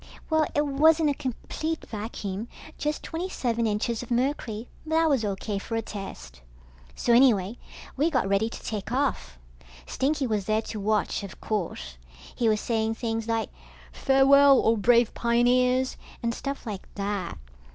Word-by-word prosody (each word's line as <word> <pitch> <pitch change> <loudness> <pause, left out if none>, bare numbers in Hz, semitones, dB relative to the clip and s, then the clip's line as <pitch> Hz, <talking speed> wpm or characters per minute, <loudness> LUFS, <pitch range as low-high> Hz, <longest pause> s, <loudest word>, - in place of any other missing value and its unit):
Well, 315 -1 +3
it 295 - +3
wasn't 305 +2 +4
a - - 0
complete 300 +4 -4
vacuum, 210 -1 -5 0.3
just 300 +1 -2
twenty 345 +3 -4
seven 235 -7 -1
inches 220 +2 -1
of 245 - -9
mercury, 245 -3 -1 0.2
but 315 0 -2
that 325 0 +4
was 265 -5 +2
O.K. 200 0 -2
for 225 - -5
a 225 - -1
test. 65 - -8 0.5
So 240 - +1
anyway, 235 -4 +4 0.4
we 295 +5 +2
got 255 -10 +1
ready 200 +3 +1
to - - -9
take 215 -1 -4
off. 245 - -1 0.5
Stinky 280 - 0
was 215 -5 -1
there 215 +2 +1
to 215 - -6
watch, 210 +1 0
of 200 -1 -9
course. - - -4 0.3
He 235 -2 +1
was 215 -1 +2
saying 225 -1 -1
things 225 -1 -3
like, 225 -1 -1 0.4
farewell, 275 0 +5
O 225 - +4
brave 235 +2 +3
pioneers, 250 +2 +2 0.3
and 235 0 0
stuff 275 +3 -5
like 205 -4 -6
that. 200 -3 -3
230 Hz, 160 wpm, -26 LUFS, 210-270 Hz, 0.5 s, farewell